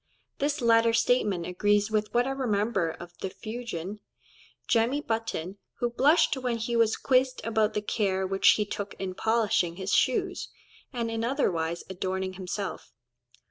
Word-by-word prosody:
This 290 +1 0
latter 230 -1 +4
statement 210 -7 +2
agrees 205 +4 +1
with 215 -1 0
what 240 +1 +2
I 270 - -1
remember 215 -8 0
of 175 +2 -9
the 190 - -3
Fuegian, 215 -3 -6 0.7
Jemmy 235 +4 +2
Button, 220 - -3 0.2
who 240 -1 -1
blushed 290 +6 +4
when 250 -2 -1
he 230 +1 -2
was 225 -1 +3
quizzed 255 -1 +2
about 220 -1 +1
the 210 - -1
care 190 -3 0
which 195 +1 +5
he 210 - 0
took 205 -1 -5
in 190 -1 -4
polishing 210 -5 +1
his 190 +1 -3
shoes, 255 -2 +1 0.4
and 235 -3 -2
in 225 0 -2
otherwise 175 - 0
adorning 190 0 -3
himself. 190 +1 -5
215 Hz, 150 wpm, -28 LUFS, 190-235 Hz, 0.7 s, which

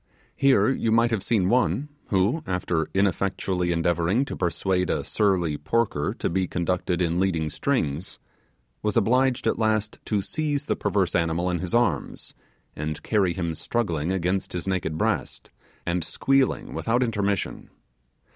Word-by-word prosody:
Here, 130 -7 +4
you 115 -4 +1
might 115 +1 +4
have 110 -4 0
seen 100 -3 +1
one, 125 +5 +2 0.2
who, 100 - +1
after 90 -3 -1
ineffectually 95 -2 0
endeavouring 85 +8 +1
to - - -5
persuade 90 +1 0
a - - 0
surly 90 -8 +1
porker 100 -3 0
to - - -1
be 95 +1 0
conducted 90 0 -1
in 85 +1 0
leading 85 -5 0
strings, 90 - -1 0.6
was 105 +1 0
obliged 125 +3 +2
at - - +1
last 110 -1 0
to 105 -3 0
seize 150 +1 -2
the - - 0
perverse 95 -3 0
animal 85 +1 +1
in 90 - -1
his 90 +5 -2
arms, 100 - 0 0.4
and 75 0 -4
carry 100 -5 +2
him 85 -3 -2
struggling 85 -4 -1
against 95 +1 -1
his 90 +1 -4
naked 90 -4 -1
breast, - - -2 0.3
and 85 0 0
squealing 135 +9 +1
without 120 +3 +1
intermission. 100 -4 -2
95 Hz, 145 wpm, -25 LUFS, 85-115 Hz, 0.6 s, Here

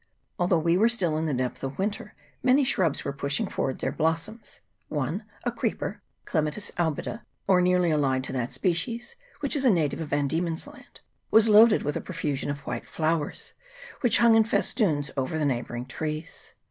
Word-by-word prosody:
Although 175 0 +3
we 170 +3 +2
were 225 +3 +5
still 180 -10 +1
in 160 +1 -1
the 150 - -1
depth 125 -1 -3
of 135 0 -4
winter, 205 +2 -3 0.3
many 260 +3 +4
shrubs 180 - +1
were 140 - -2
pushing 140 +10 0
forward 135 -8 -2
their - - -2
blossoms; 165 +8 -2 0.3
one, 155 - -3 0.2
a 245 - 0
creeper 230 -1 -3 0.2
(Cle 160 - +1
matis 155 +7 -4
albida, 175 +6 -2 0.2
or 185 -2 +4
nearly 180 -1 +3
allied 135 -4 +1
to - - -5
that 125 -2 -2
species, 180 - -2 0.3
which 285 -1 0
is 280 - 0
a 260 - +5
native 165 -6 +1
of 160 - -4
Van 145 0 0
Diemen's 165 +2 -2
Land), - - -15 0.3
was 220 0 +5
loaded 215 +1 +7
with 145 - -2
a - - -2
profusion 145 -2 -3
of 145 -1 -4
white - - -5
flowers, 160 -1 -2 0.5
which 245 - +4
hung 235 -1 +6
in 225 0 +6
festoons 195 -8 +1
over 135 +3 -1
the 155 - 0
neighbouring 120 -2 -2
trees. 155 +4 -6
165 Hz, 185 wpm, -26 LUFS, 145-210 Hz, 0.5 s, loaded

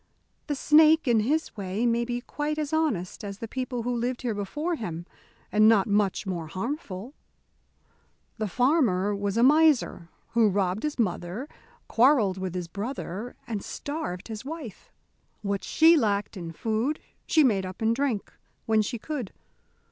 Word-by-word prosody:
The 295 - -1
snake, 310 +2 +5
in 235 -2 +4
his 295 +9 0
way, 200 +2 -2
may 235 0 +2
be 240 0 -3
quite 295 +4 -3
as 305 -1 -3
honest 230 - -1
as 200 -1 -6
the 230 - -6
people 250 0 -3
who 245 +1 -1
lived 245 +2 -2
here 240 -3 0
before 295 - -3
him, 175 - -5 0.5
and 215 +1 +5
not 210 -4 +5
much 205 -1 +1
more 175 -4 -3
harmful. 215 - -5 1.3
The 215 - 0
farmer 210 - +2
was 200 +1 -2
a 235 - +4
miser 290 - +4 0.2
who 230 -2 +4
robbed 190 0 0
his 300 -1 -2
mother, 190 +3 -2 0.4
quarrelled 225 -7 +4
with 185 -1 -4
his 180 -2 -3
brother, 210 +2 -5
and 215 -4 -4
starved 245 - -5
his 220 0 -6
wife. 280 - -8 0.5
What 200 0 -2
she 325 +1 +5
lacked 210 -7 0
in 170 -3 -6
food, 225 - -1 0.3
she 315 - +5
made 210 -8 +3
up 185 0 -7
in 225 0 +2
drink, 245 -5 -2 0.3
when 220 -1 +3
she 235 +3 -3
could. 255 -3 -5
225 Hz, 160 wpm, -27 LUFS, 200-275 Hz, 1.3 s, snake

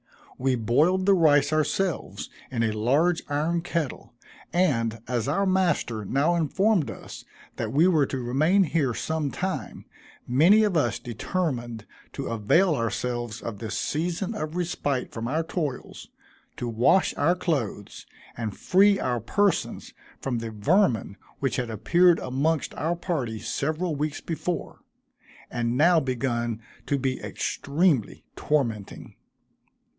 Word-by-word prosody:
We 130 0 +2
boiled 150 - +2
the 200 - +5
rice 150 -4 +4
ourselves, 155 +3 -1 0.2
in 115 -3 -1
a 110 - +1
large 140 +11 +2
iron 155 +4 0
kettle; 165 -8 -4 0.4
and, 115 -11 +1
as 120 -2 -1
our 200 +1 +1
master 175 - +1
now 140 - +1
informed 170 - +1
us - - -9 0.3
that - - -3
we 155 +6 +4
were 155 -7 +3
to 135 - -3
remain 155 +11 +3
here 145 -8 0
some 160 -2 -2
time, 190 +6 -4 0.4
many 170 - +5
of 205 -4 +1
us 155 - +1
determined 120 - -3 0.3
to - - -4
avail 135 - +3
ourselves 120 -2 -3
of 105 -4 -5
this 110 -3 -4
season 175 +6 -2
of 155 -4 -4
respite 145 -7 -2
from 115 0 -4
our 155 +6 0
toils, 155 -6 -5 0.5
to 120 - -3
wash 120 +11 +3
our 165 +5 +3
clothes, 135 - -3 0.3
and 110 -4 -4
free 200 +2 +4
our 125 -2 -1
persons 200 - 0 0.3
from 125 -3 -2
the 115 0 -5
vermin 115 - +1 0.2
which 135 -2 -1
had 125 -2 -2
appeared 170 - +4
amongst 145 +5 -1
our 165 +3 -1
party 155 -11 -3
several 155 +8 -2
weeks 150 +1 -2
before, 165 +1 -4 0.7
and 120 0 -1
now 170 +3 +5
begun 120 -4 -2 0.3
to 140 - +1
be 130 -1 -2
extremely 145 - 0
tormenting. 115 -9 -2
145 Hz, 135 wpm, -26 LUFS, 120-175 Hz, 0.7 s, the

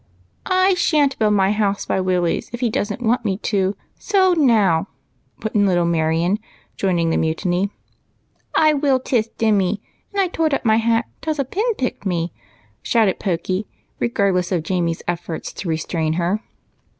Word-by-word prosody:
" - - -40 0.2
I 390 - +4
shanH 300 -6 +2
build 210 -1 +3
my 195 0 +3
house 205 -2 0
by 190 - 0
Willie's 180 -2 0
if 240 +1 -6
he 240 -3 +1
don't 210 +3 -2
want 240 +2 +2
me 195 -4 -1 0.2
to, 195 0 +1 0.2
so 380 -3 +3
now! 215 - +3 0.3
" - - -41
put 220 - -3
in 205 -1 +3
little 175 -2 +2
Marion, 170 +4 +1 0.4
joining 175 -4 +1
the - - +1
mutiny. 175 +4 0 0.5
" - - -43
I 310 -1 +5
loill 275 -2 +2
tiss 230 -3 0
Dimmy! 205 -3 +2 0.3
and 400 - -3
I 385 - +3
tored 320 -4 0
up - - -5
my 220 -1 +4
hat 230 +1 +2 0.2
'tause 315 -1 -2
a 275 - 0
pin 435 - -1
picked 255 - -3
me," 170 -2 -1 0.5
shouted 220 -5 +2
Pokey, 185 +2 -2 0.3
regardless 200 -7 +1
of 175 -4 0
Jamie's 170 -1 -1
efforts 175 -1 -4
to 180 - -5
restrain 160 0 -1
her. 180 +5 0
200 Hz, 175 wpm, -20 LUFS, 175-245 Hz, 0.5 s, I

